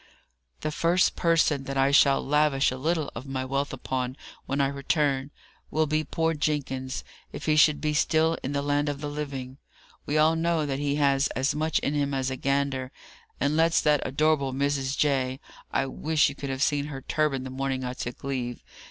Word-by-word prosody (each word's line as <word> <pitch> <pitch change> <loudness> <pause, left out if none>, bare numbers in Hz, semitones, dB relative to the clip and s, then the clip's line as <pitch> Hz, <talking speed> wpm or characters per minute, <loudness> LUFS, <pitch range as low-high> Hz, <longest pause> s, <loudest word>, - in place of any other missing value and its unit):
"The 155 - -2
first 170 +3 +2
person 160 -5 +2
that 135 0 -4
I 135 +1 +3
shall 140 -1 +4
lavish 145 -2 +3
a 130 - -4
little 155 +2 -1
of 125 +4 -8
my 130 -1 -3
wealth 140 +2 -1
upon, 130 0 -3 0.3
when 140 - -1
I 140 - +4
return, 140 0 0 0.4
will 155 0 +1
be 155 +1 0
poor 165 +2 0
Jenkins, 135 -4 -2 0.3
if - - -7
he 155 - +3
should 155 -1 +5
be 150 -1 -1
still 160 +2 +2
in 135 - -3
the 140 0 -1
land 145 +1 +1
of 145 -1 -4
the 145 - -4
living. 140 -3 -5 0.5
We 150 - +1
all 155 +1 +4
know 165 -1 +1
that 135 -1 -2
he 145 0 0
has 140 -1 +3
as 135 +2 +1
much 155 +1 0
in 140 - -1
him 140 -1 0
as 130 0 -1
a - - -2
gander, 135 -1 -1 0.5
and 145 +2 +1
lets 165 +1 +4
that 150 -2 +3
adorable 140 0 +1
Mrs. 140 0 -1
J. 130 -3 +1 0.3
(I - - +1
wish 155 +3 +1
you - - -6
could 140 -1 -6
have 135 +1 -1
seen 145 -1 +1
her 140 -3 -6
turban 150 -4 0
the 130 - -6
morning 135 0 -2
I 125 0 -3
took 125 -1 -6
leave!) 125 -3 -3
140 Hz, 200 wpm, -27 LUFS, 135-150 Hz, 0.5 s, should